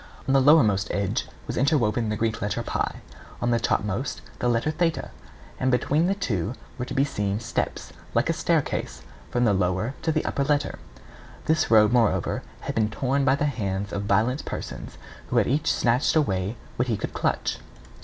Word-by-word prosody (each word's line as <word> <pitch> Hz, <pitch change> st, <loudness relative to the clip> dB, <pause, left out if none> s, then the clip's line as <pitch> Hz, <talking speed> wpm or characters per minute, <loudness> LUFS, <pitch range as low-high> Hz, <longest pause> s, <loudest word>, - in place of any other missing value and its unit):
On 135 Hz, -, +2 dB
the 135 Hz, -, +5 dB
lower 150 Hz, +3 st, +7 dB
most 105 Hz, -1 st, +1 dB
edge 100 Hz, -1 st, -1 dB, 0.2 s
was -, -, -4 dB
inwoven 120 Hz, -5 st, +2 dB
the 105 Hz, -, 0 dB
Greek 110 Hz, 0 st, -1 dB
letter 105 Hz, +3 st, -1 dB
[Greek: -, -, -6 dB, 0.2 s
P], -, -, -12 dB, 0.4 s
on 120 Hz, -, 0 dB
the 115 Hz, -, +3 dB
topmost 105 Hz, +3 st, -1 dB, 0.2 s
the 120 Hz, -, +1 dB
letter 120 Hz, +6 st, +1 dB
[Greek: 165 Hz, +1 st, +1 dB
Th],[A] -, -, -7 dB, 0.5 s
and 130 Hz, -, +1 dB
between 145 Hz, +6 st, +2 dB
the 195 Hz, -, +1 dB
two 115 Hz, -, -2 dB, 0.2 s
were 125 Hz, -, -1 dB
to -, -, -6 dB
be 135 Hz, -, +4 dB
seen 105 Hz, -7 st, -2 dB
steps, 115 Hz, -, -3 dB, 0.2 s
like -, -, +3 dB
a -, -, +2 dB
staircase, -, -, -1 dB, 0.3 s
from 120 Hz, 0 st, +1 dB
the 105 Hz, -, +4 dB
lower 95 Hz, +5 st, 0 dB
to 160 Hz, -, +1 dB
the 155 Hz, 0 st, 0 dB
upper 140 Hz, -, 0 dB
letter. 145 Hz, +1 st, 0 dB, 0.7 s
This 160 Hz, 0 st, +2 dB
robe, 110 Hz, -1 st, +6 dB
moreover, 120 Hz, -3 st, +2 dB, 0.2 s
had -, -, -4 dB
been 110 Hz, -1 st, +1 dB
torn 135 Hz, +5 st, 0 dB
by 135 Hz, 0 st, +4 dB
the 145 Hz, -, 0 dB
hands 100 Hz, -7 st, -2 dB
of 100 Hz, -, -1 dB
violent 110 Hz, +7 st, +2 dB
persons, -, -, -6 dB, 0.3 s
who -, -, -1 dB
had -, -, +5 dB
each 145 Hz, +5 st, +1 dB
snatched 125 Hz, +6 st, +2 dB
away 100 Hz, -7 st, +1 dB, 0.2 s
what 125 Hz, -, +1 dB
he 115 Hz, -4 st, 0 dB
could -, -, -5 dB
clutch. -, -, -1 dB
120 Hz, 195 wpm, -25 LUFS, 105-140 Hz, 0.7 s, lower